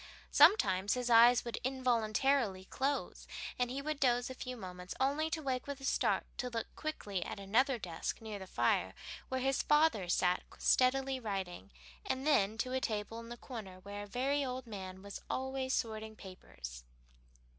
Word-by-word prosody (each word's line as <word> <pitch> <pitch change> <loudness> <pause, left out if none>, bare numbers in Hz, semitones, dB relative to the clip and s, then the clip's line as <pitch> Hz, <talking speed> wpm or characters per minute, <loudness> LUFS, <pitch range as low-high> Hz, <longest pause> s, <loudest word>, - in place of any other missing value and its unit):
Sometimes 205 - +5
his 250 -1 -1
eyes 235 +1 +7
would 235 - -3
involuntarily 245 -4 +1
close 275 +7 -2 0.3
and 250 -1 +1
he 270 +2 -4
would 305 -1 -2
doze 245 -1 +2
a - - -4
few 255 -1 -6
moments, 180 -3 -7
only 285 +4 +1
to 320 -1 -3
wake 260 0 -2
with 280 -1 -4
a 270 - -7
start - - +2
to 250 - -2
look 230 -2 -5
quickly 205 - -3
at - - -6
another 240 +7 +2
desk 170 -7 -4
near 215 -2 -6
the 190 - -8
fire 95 - +1 0.3
where 260 0 -1
his 270 +1 +2
father 295 - +3
sat 180 0 +2 0.2
steadily 265 +1 +3
writing, 190 - -4 0.3
and 260 +1 -2
then 220 -8 +3
to 255 +2 -2
a 260 - 0
table 215 0 -2
in 230 0 -9
the 240 - -7
corner 215 -8 -8
where 205 +1 -6
a 205 - -7
very 270 +6 0
old 255 -1 -4
man 190 -4 -7
was 200 0 -7
always 265 0 -2
sorting 220 -3 -2
papers. 60 - -9
240 Hz, 175 wpm, -34 LUFS, 200-265 Hz, 0.3 s, eyes